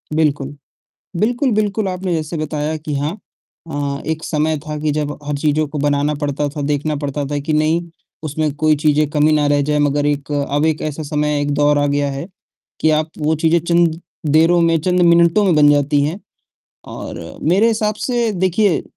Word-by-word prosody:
बिल्कुल। 145 -3 0 0.6
बिल्कुल, 240 +5 +1
बिल्कुल 210 -1 0
आपने 185 -1 -2
जैसे 160 +1 -3
बताया 155 0 -2
कि 150 -1 -5
हाँ 150 +8 -3 0.5
अ, 140 -1 -3
एक 160 0 -3
समय 155 0 0
था 150 +1 -6
कि 150 0 0
जब 150 0 -2
हर 145 0 -3
चीज़ों 150 +1 +1
को 145 +1 -6
बनाना 145 +1 +1
पड़ता 145 0 -1
था, 145 +1 -6
देखना 150 +1 -1
पड़ता 145 0 -3
था 145 - -1
कि 155 +2 -3
नहीं 155 +2 +2 0.4
उसमें 155 0 -1
कोई 155 +1 +2
चीज़ें 150 0 +2
कमी 150 0 +2
ना 150 -1 +2
रह 145 0 +2
जाए। 150 +1 0
मगर 145 0 +1
एक 145 0 -1
अब 145 +1 0
एक 160 -1 0
ऐसा 155 +1 -4
समय, 150 0 -1
एक 145 - -1
दौर 145 0 +3
आ 145 - +2
गया 145 0 0
है 135 +4 -5 0.6
कि 160 - +3
आप 155 +1 0
वो 155 0 +1
चीज़ें 165 +1 +4
चंद 170 -1 +1 0.3
देरों 165 +3 +4
में, 165 -1 +3
चंद 180 +2 +1
मिनटों 170 +3 +4
में 185 -4 +3
बन 150 -1 +6
जाती 145 0 +2
है। 155 +6 -2 0.7
और 85 0 -8
मेरे 190 +9 +3
हिसाब 215 -2 0
से 235 +1 -1
देखिए 185 0 +1
155 Hz, 195 wpm, -18 LUFS, 145-165 Hz, 0.7 s, बन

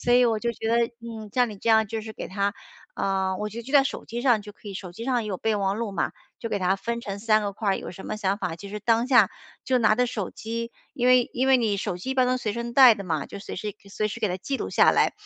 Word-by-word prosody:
所 245 - +1
以 250 0 +6
我 225 -2 +2
就 235 +2 -1
觉 225 0 -4
得， 235 +1 +3
嗯， 225 -2 -8
像 245 -1 +3
你 210 - -8
这 230 - -4
样 220 0 +5
就 220 +1 -4
是 220 0 -8
给 - - -6
它 200 +2 -1 0.4
啊， 190 -1 0
我 210 +2 -3
就 230 +3 -7
记 270 - -9
在 280 -2 +6
手 - - -4
机 240 +1 -5
上 240 -5 +3
就 210 0 -10
可 210 - -12
以。 200 - -7
手 185 -2 -7
机 225 +6 -7
上 250 -2 +1
也 215 - -5
有 195 - -2
备 220 +3 0
忘 195 0 0
录 225 -2 -3
嘛， - - -1 0.3
就 230 - -4
给 205 - -1
他 190 0 +1
分 235 +4 -3
成 200 -3 -5
3 215 0 +3
个 200 -1 -2
块 205 0 -1
儿。 195 - +2
有 - - -7
什 190 - -10
么 215 - -3
想 200 -2 0
法， 170 -6 -3
其 200 - -9
实 210 +1 -6
当 230 +3 +2
下 240 -7 +5 0.3
就 255 -1 +2
拿 220 -2 +4
着 250 +2 +2
手 210 -6 -3
机， 230 +1 -5 0.2
因 245 0 0
为 250 -1 +5
因 255 +2 0
为 265 -1 +6
你 220 -4 +1
手 185 - -3
机 185 +9 -5
一 - - -1
般 255 -1 +3
能 255 0 +1
随 215 -4 -2
身 235 +2 -4
带 255 -2 +8
的 200 - -7
嘛， 160 -5 -2
就 - - -8
随 200 - -7
时 205 +1 -4 0.2
随 215 +2 -1
时 215 - -6
给 215 - +1
它 180 - -2
记 270 +9 -3
录 - - -4
下 - - +5
来。 - - +3
220 Hz, 325 characters per minute, -25 LUFS, 200-235 Hz, 0.4 s, 带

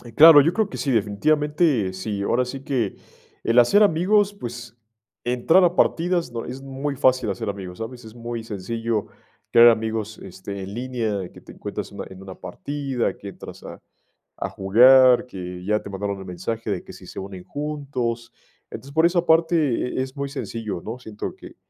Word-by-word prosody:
Claro, 160 -1 +10
yo 165 +5 +2
creo 215 0 0
que - - -7
sí, 140 - -1
definitivamente 130 - +1
sí. 100 +2 -4
Ahora 125 +5 +1
sí 135 +2 -7
que 125 -8 -1 0.5
el 115 +2 +4
hacer 160 - +6
amigos, 200 +3 +3
pues, 120 - -8 0.5
entrar 125 +10 +3
a 175 0 +3
partidas 170 -6 +1
no 115 -1 -5
Es 135 +1 -7
muy 135 +1 -4
fácil 130 -3 +2
hacer 100 +2 -3
amigos, 95 -3 -6
¿sabes? 120 +2 -7
Es 110 - -12
muy 115 -1 -5
sencillo 115 +1 -3 0.4
crear 120 0 +8
amigos, 110 -1 -1
este, 95 +1 -8
en 95 +1 -7
línea, 115 -6 -3
que - - -15
te - - -13
encuentras - - -6
en - - -12
una - - -5
en 95 0 -12
una 95 -1 -9
partida, 135 +7 -3
que 100 - -10
entras - - -11
a, - - -10 0.6
a - - -3
jugar, 125 +6 +6
que 90 -5 -7
ya 105 +1 +1
te - - -9
mandaron 100 0 -3
el 95 - -9
mensaje 100 +6 -4
de 95 - -3
que - - -12
si - - -13
se - - -8
unen 95 -2 -8
juntos. 135 -6 -4 0.4
Entonces, 140 +1 -9
por 160 +1 +4
esa 175 0 +2
parte, 165 +1 +4 0.4
eh, - - +2
es 130 0 -4
uy 140 -1 -3
sencillo, 115 - -5
¿no? 115 +3 -6
Siento 110 -3 -6
que - - -13
120 Hz, 190 wpm, -23 LUFS, 100-140 Hz, 0.6 s, Claro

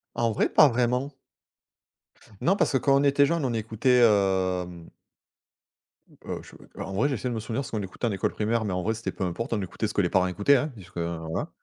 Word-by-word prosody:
En 115 -1 +1
vrai, - - +1
pas 150 - +7
vraiment. 125 +3 0 1.3
Non, 185 - +3
parce - - +1
que - - +2
quand 135 +1 +2
on - - +1
était 140 0 +4
jeune, 165 -1 0
on 125 - 0
écoutait, 115 +3 +1
hem 95 -5 +1 1.2
mmh, - - -21
heu, - - -4
je, - - -15
heu, - - -11
en 95 - -6
vrai, 125 +9 +2
j'essaie 130 -2 -2
de 120 - -3
me 110 - -3
souvenir 115 +5 -3
ce - - -9
qu'on 110 -2 -2
écoutait 95 +5 -4
en 110 - 0
école 95 - -1
primaire, 110 +1 -1
mais 100 - -2
en 90 0 -2
vrai, 110 +4 0
c'était 115 +1 -5
peu 95 - -4
importe, 115 +8 -4
on 110 - 0
écoutait 95 +3 -3
ce 105 - -6
que - - +2
les 90 - +2
parents 95 0 +2
écoutaient, 105 +10 +3
hein, 145 +5 0
puisque, 90 -4 -15
hein, 85 -1 -3
voilà. - - -3
110 Hz, 245 wpm, -26 LUFS, 95-125 Hz, 1.3 s, pas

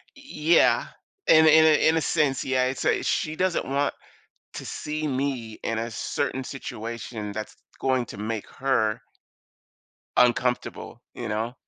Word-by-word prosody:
E 275 - -15
e 170 - +1
Yeah. - - +4 0.4
In 160 0 +7
a - - +7
in 160 +1 +7
a 155 -1 +5
in 160 - +2
a - - +1
sense, 140 -3 +1
yeah, 130 -1 +1
it's, 130 +1 -2
uh - - +2
she 155 0 -1
doesn't 185 +1 0
want 140 +1 0 0.6
to - - -6
see 155 0 -4
me 130 -5 -2
in 115 -1 -2
a 115 +1 -3
certain 130 +4 -2
situation 115 -4 -6
that's 110 +1 -6 0.2
going 130 -2 +1
to - - -9
make 110 +1 -4
her 115 -4 +1 1.2
uncomfortable, 125 0 +1
you 120 - -6
know? 110 +3 -2
130 Hz, 160 wpm, -25 LUFS, 115-150 Hz, 1.2 s, In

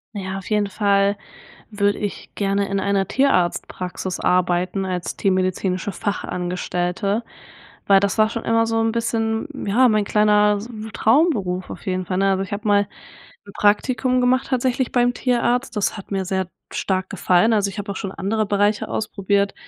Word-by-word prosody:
Ja, 190 -1 -4
auf 195 - -10
jeden 210 -1 +2
Fall 200 0 +2 0.5
würde 205 -1 +1
ich 205 -1 -6
gerne 200 0 0
in 195 - -1
einer 195 -1 0
Tierarztpraxis 185 -6 0
arbeiten 180 +1 +1
als 180 -2 -3
tiermedizinische 185 +1 0
Fachangestellte, 180 +2 -2 0.6
weil 195 -1 +6
das 200 +2 -1
war 215 - +5
schon 230 +1 -5
immer 230 0 +2
so 225 0 0
'n 225 0 +1
bisschen, 225 +2 -1 0.2
ja, 245 +6 +4
mein 215 -2 +2
kleiner 210 0 +3
s 215 +4 -8
wu 220 -1 -7
Traumberuf 220 - +1
auf - - -9
jeden 185 -1 -1
Fall 185 +1 -2
ne? 195 0 +3
Also, 190 0 0
ich 195 +2 -7
habe 210 +1 -3
mal 205 0 +4 0.6
'n 200 - -11
Praktikum 250 +5 +2
gemacht, 255 +1 +2
tatsächlich 255 -1 0
beim 245 0 +2
Tierarzt. 245 +1 0
Das 210 - 0
hat 205 - -10
mir 195 -1 -1
sehr 190 -1 -1 0.2
stark 185 -1 -1
gefallen. 185 +5 +3
Also, 200 -2 +1
ich 195 - -10
habe 205 0 -4
auch - - -9
schon 195 0 -4
andere 215 +3 -1
Bereiche 205 +1 +1
ausprobiert. 200 -1 -1
200 Hz, 170 wpm, -21 LUFS, 190-225 Hz, 0.6 s, weil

